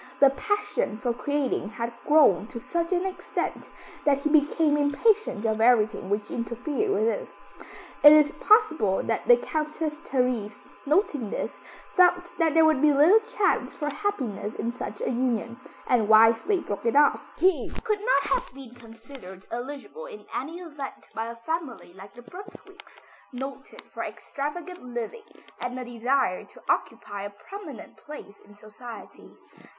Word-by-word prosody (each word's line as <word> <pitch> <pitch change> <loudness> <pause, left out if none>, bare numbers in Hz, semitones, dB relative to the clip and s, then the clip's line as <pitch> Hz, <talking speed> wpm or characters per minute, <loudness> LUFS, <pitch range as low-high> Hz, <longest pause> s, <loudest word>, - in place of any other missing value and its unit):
The 275 -1 +7
passion 415 - -2
for 240 0 -1
creating 280 -2 -2
had 235 +1 -5
grown 285 - +5
to 235 - -7
such 335 +8 -2
an 365 0 +1
extent, 380 -1 -4 0.3
that 285 -2 +3
he 280 +2 -2
became 300 0 +3
impatient 295 - +1
of 220 0 0
everything 220 -5 +3
which 205 0 -2
interfered 250 - -2
with 310 - +1
it. 230 - -2 0.7
It 295 - +11
is 300 -1 +6
possible 320 - +3
that - - -2
the 485 -1 +8
Countess 310 -4 -3
Therese, 250 -8 -1 0.3
noting 295 - +1
this, - - -4 0.4
felt 355 -1 +3
that 325 -2 +2
there 325 0 +6
would 310 -4 +3
be 300 0 +5
little 310 +10 +6
chance 445 -3 -1
for 295 -1 -3
happiness 270 - -3
in 235 - -2
such 250 - -7
a - - -1
union, 235 -1 -1 0.3
and 225 -4 +2
wisely 225 - +5
broke 205 -4 -4
it 230 - +1
off. 290 0 +5 0.2
He 370 -1 +2
could 425 -2 0
not - - +2
have - - -2
been 265 -3 -11
considered 225 -5 -13
eligible 285 - -7
in 435 -4 -11
any 315 +6 -4
event 295 -5 -8
by 225 +1 -3
a 235 - -7
family 260 - -5
like 195 +1 -13
the 245 - -12
Brunswicks, 390 - -13 0.3
noted 265 +2 -8
for - - -5
extravagant 345 +5 -6
living 250 - -7 0.2
and 245 +1 -4
a 255 - -5
desire 245 -3 0
to - - -18
occupy 205 -1 -2
a 200 - -5
prominent 295 - -11
place 295 -9 -11
in 205 0 -18
society. 215 +3 -12
275 Hz, 155 wpm, -26 LUFS, 230-335 Hz, 0.7 s, It